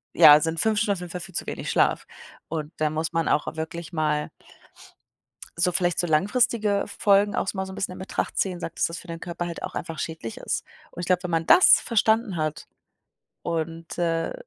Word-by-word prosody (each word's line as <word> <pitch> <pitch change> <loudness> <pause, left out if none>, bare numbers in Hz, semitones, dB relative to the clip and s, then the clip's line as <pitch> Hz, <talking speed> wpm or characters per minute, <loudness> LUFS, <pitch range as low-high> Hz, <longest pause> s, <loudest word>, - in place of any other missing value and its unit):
ja, 150 0 +9
sind 165 0 -1
5 220 -1 +1
Stunden 210 -1 +2
auf 190 - -6
jeden 180 -1 -7
Fall 180 0 -5
viel 190 +1 -11
zu - - -2
wenig - - -5
Schlaf. - - +2 0.4
Und 155 -1 -4
da 155 -1 +1
muss 160 +2 -3
man 165 -1 0
auch 150 - +1
wirklich 160 +2 -6
mal 150 -2 0 1.3
so 180 +1 +3
vielleicht 175 0 0
so 175 - +1
langfristige 205 +5 +2
Folgen 205 -1 +2
auch - - 0
so 195 - -3
mal 190 - -1
so 190 - -8
'n - - -8
bisschen 190 -2 -3
in - - -9
Betracht 190 - -3
ziehen, 185 -3 0
sagt, 165 - -7
das 165 - -6
für - - -12
den 165 0 -6
Körper 175 0 -4
halt 170 -1 -6
auch - - -5
einfach 165 -2 -5
schädlich 160 -9 -5
ist. - - -3 0.3
Und - - -9
ich 175 - -4
glaube, 180 0 +1
wenn 175 - -3
man 165 0 0
das 360 - +7
verstanden 220 -2 +1
hat 155 -1 -3 0.8
und, 165 0 -4
äh, 165 -1 0
170 Hz, 215 wpm, -25 LUFS, 160-190 Hz, 1.3 s, ja